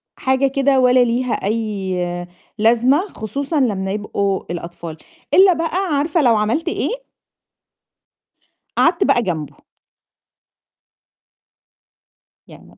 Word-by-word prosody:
حاجة 265 +1 +1
كده 275 0 +2
ولا 250 0 +4
ليها 245 0 0
أي 190 -5 -2 0.3
لازمة 240 - +3
خصوصًا 280 - -3
لمّا 195 -7 0
يبقوا 200 -1 -2
الأطفال، 170 -1 -7 0.4
إلّا 380 0 +7
بقى 330 +1 -2 0.2
عارفة 300 +3 +1
لو 240 -5 +4
عملت 215 +10 -1
إيه؟ - - -3 1.7
قعدت - - +3
بقى 240 - +3
جنبه. 160 -9 -4 2.9
يعني - - -16
235 Hz, 95 wpm, -19 LUFS, 195-275 Hz, 2.9 s, إلّا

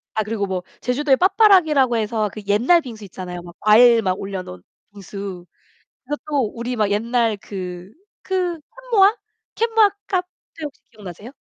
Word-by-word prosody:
아 215 - +1
그리고 210 -1 -3
뭐 185 -1 -3 0.2
제주도에 265 +2 +2
빠빠라기라고 355 - +4
해서 215 -1 -1
그 215 - -7
옛날 245 +12 +4
빙수 225 -6 -9
있잖아요. 180 -1 -7
막 175 0 -13
과일 230 +2 +6
막 185 -2 -1
올려 195 -1 -4
놓은 90 - -10 0.3
빙수. 195 -2 -8 0.6
그것도 285 -4 -2
우리 240 +1 -4
막 210 -2 +1
옛날 230 +1 +1
그 185 -1 -8 0.3
그 365 -3 -1 0.3
캔모아? 410 0 +5 0.4
캔모아 450 -2 +3 0.2
카페 365 -2 -1 0.4
혹시 290 -2 -7
기억나세요? 205 +1 -10
225 Hz, 320 characters per minute, -21 LUFS, 200-295 Hz, 0.6 s, 과일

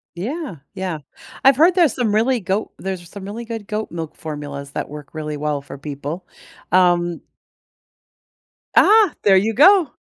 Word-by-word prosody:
Yeah. 255 - -5 0.2
Yeah. 185 -5 -4 0.5
I've 270 0 +7
heard 335 +6 +5
there's 335 - +4
some 230 -5 0
really 235 +4 +2
goat 200 +2 -2
there's 190 -2 -5
some 195 +1 -9
really 220 +4 -6
good 225 -3 -6
goat 215 -3 -3
milk 165 -2 -6
formulas 145 -2 -7
that - - -4
work 150 -1 -10
really 150 -1 -4
well 150 -1 -2
for 140 - -10
people, 145 +5 -6 0.4
um 175 -2 +3 1.6
Ah, 425 -4 +6
there 195 -2 +6
you 220 +4 +1
go! 365 - +6
190 Hz, 155 wpm, -20 LUFS, 155-235 Hz, 1.6 s, I've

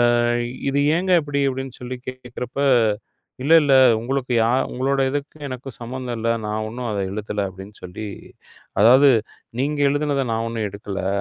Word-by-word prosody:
ஆ, - - +2 0.5
"இது 140 +1 +1 0.2
ஏங்க 185 +1 -1
இப்படி?" 145 -1 -2
அப்படி 130 0 -3
என்று 130 - -12
சொல்லிக் 125 0 -7
கேட்குறப்போ, 130 +1 -4 0.8
"இல்லை, 160 +3 +6
இல்லை. 135 -2 +5 0.2
உங்களுக்கு 130 +1 -2
யார் 125 +3 +2
உங்களோட 135 +2 0
இதுக்கு 145 +2 -4
எனக்கும் 130 0 -8
சம்பந்தம் 125 0 -5
இல்லை. 115 +1 +1
நான் 110 +1 -2
ஒன்றும் 120 +1 -5
அதை 100 -2 -1
எழுதவில்லை" 105 -1 -3
அப்படி 95 +1 -10
என்று 105 - -18
சொல்லி, 100 +4 -7 0.7
அதாவது, 130 +5 +7 0.5
"நீங்க 145 +1 -1
எழுதியதை 145 -1 0
நான் 115 0 -1
ஒன்றும் 110 -2 -2
எடுக்கவில்லை. 100 -1 -5
125 Hz, 160 wpm, -22 LUFS, 110-140 Hz, 0.8 s, அதாவது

